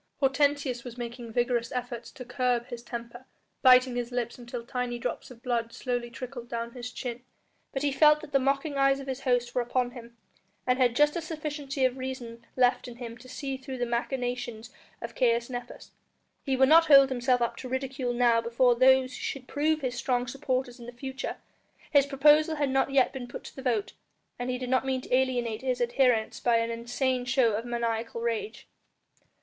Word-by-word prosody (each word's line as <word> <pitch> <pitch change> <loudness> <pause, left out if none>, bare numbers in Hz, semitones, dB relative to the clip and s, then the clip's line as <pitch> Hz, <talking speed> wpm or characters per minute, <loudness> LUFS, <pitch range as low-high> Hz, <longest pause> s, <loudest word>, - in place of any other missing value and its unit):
Hortensius 275 -2 +1
was 245 -1 -9
making 235 -1 -6
vigorous 240 0 0
efforts 245 -1 -5
to 250 - -9
curb 245 -1 0
his 240 -1 -6
temper, 235 +1 -8 0.4
biting 255 -1 +6
his 245 0 -3
lips 245 0 -3
until 240 -1 -7
tiny 250 -1 -3
drops 240 - -4
of 245 -1 -14
blood 235 -3 -1
slowly 245 -1 -3
trickled 245 -1 -8
down 235 0 -4
his 245 0 -7
chin. 245 -2 -5 0.5
But 270 - -3
he 285 - +2
felt 300 +2 +5
that 315 - -10
the 275 - +4
mocking 275 +2 0
eyes 275 0 +4
of 275 - -7
his 265 -1 -4
host 245 -2 +1
were 250 - +1
upon 245 +1 -1
him, 235 -1 -12 0.5
and 250 +1 +2
had 245 -2 +3
just 295 +2 +4
a 340 - -1
sufficiency 300 -4 -3
of 255 0 0
reason 250 -3 -6
left 250 0 +2
in 240 - -9
him 235 -1 -7
to 255 +2 -14
see 270 0 -4
through 265 0 -7
the 245 - 0
machinations 245 -1 -3 0.3
of 235 0 -6
Caius 235 0 +1
Nepos. 245 0 -7 0.5
He 270 - 0
would 265 0 +5
not 325 +3 +7
hold 275 -2 +8
himself 250 0 +1
up 235 -1 0
to 255 - -7
ridicule 260 -1 -2
now 240 -1 +3
before 235 +2 +3
those 260 +1 +4
who - - -8
should 260 -2 -4
prove 310 +2 0
his 255 -2 -2
strong 250 -1 0
supporters 255 -1 -3
in 235 - -10
the - - -6
future; 265 +2 -5 0.5
his 280 -2 +5
proposal 300 +3 +4
had 285 -3 0
not 270 +1 +2
yet 270 -2 +3
been 255 -2 -6
put 240 - -8
to - - -11
the 265 - -7
vote, 235 -6 -1 0.5
and 245 +1 -3
he 250 - -1
did 255 0 -5
not 260 0 +3
mean 265 -1 -1
to 250 - 0
alienate 245 -4 0
his 255 -1 -1
adherents 240 -2 +2
by 240 -1 +2
an 230 0 0
insane 245 +2 -1
show 245 -2 +2
of 220 +3 -2
maniacal 230 -1 -2
rage. 235 - -3
250 Hz, 200 wpm, -28 LUFS, 240-265 Hz, 0.5 s, hold